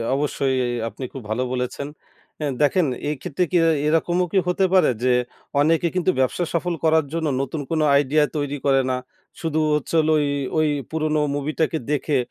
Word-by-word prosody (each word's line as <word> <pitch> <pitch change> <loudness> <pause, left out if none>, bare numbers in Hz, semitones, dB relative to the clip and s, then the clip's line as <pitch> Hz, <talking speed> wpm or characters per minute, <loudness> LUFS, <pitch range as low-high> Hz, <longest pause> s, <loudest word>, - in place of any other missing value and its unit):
অবশ্যই। 140 -1 0
ই - - -2 0.2
আপনি 115 +4 -8
খুব 135 - -6
ভালো 115 +4 0
বলেছেন। 125 +2 -3 0.5
অ্যা 150 - -1
দেখেন 155 +4 +3 0.2
এইক্ষেত্রে 150 +3 -2
কি 180 - +3
এই 160 - +3
এইরকমও 175 +3 +2
কি - - +3
হতে 180 +2 +2
পারে? 185 - +5
যে 130 - +3 0.5
অনেকে 165 +3 +3
কিন্তু 185 0 +2
ব্যবসা 130 +7 +1
সফল 175 +1 0
করার 160 -1 +3
জন্য 165 -1 -1
নতুন 140 +3 -3
কোন 160 -1 +1
আইডিয়া 145 +2 +3
তৈরি 145 0 -2
করে 135 -1 +4
না। 130 - 0 0.4
শুধু 160 -2 -1 0.2
হচ্ছে 150 - -4
হলো 155 0 +3
ওই 145 - 0 0.3
ওই 155 0 +3 0.2
পুরোনো 155 -1 0 0.2
মুভিটাকে 155 +3 -1
দেখে, 150 0 +1
155 Hz, 175 wpm, -22 LUFS, 140-165 Hz, 0.5 s, পারে